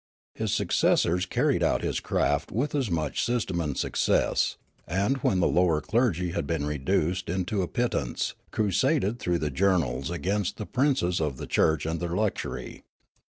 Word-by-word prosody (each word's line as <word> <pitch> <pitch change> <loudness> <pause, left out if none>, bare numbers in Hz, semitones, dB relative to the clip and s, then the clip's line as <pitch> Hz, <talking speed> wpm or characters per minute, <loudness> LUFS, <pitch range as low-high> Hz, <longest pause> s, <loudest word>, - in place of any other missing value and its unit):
His - - -2
successors 90 +2 +2
carried - - +1
out - - +1
his - - -1
craft 70 0 0
with 130 +8 -1
as 135 -7 0
much 80 -5 -1
system 115 -8 -1
and 75 -4 -3
success, - - +1 0.3
and, 100 - +1
when 95 -7 +1
the - - +4
lower 85 -3 +3
clergy 90 - 0
had 95 - -3
been 80 -3 -1
reduced 75 +5 0 0.2
to 100 +1 -1
a 90 - -1
pittance, 120 - -1 0.2
crusaded 105 +1 +1
through 90 -6 0
the 75 -3 -2
journals 85 -5 +1
against 95 +3 -1
the 105 - -5
princes 125 - +1
of 75 -4 -1
the - - -6
church 80 -1 +2
and 80 +1 -2
their 85 0 -3
luxury. 105 0 -3
90 Hz, 160 wpm, -27 LUFS, 80-105 Hz, 0.3 s, the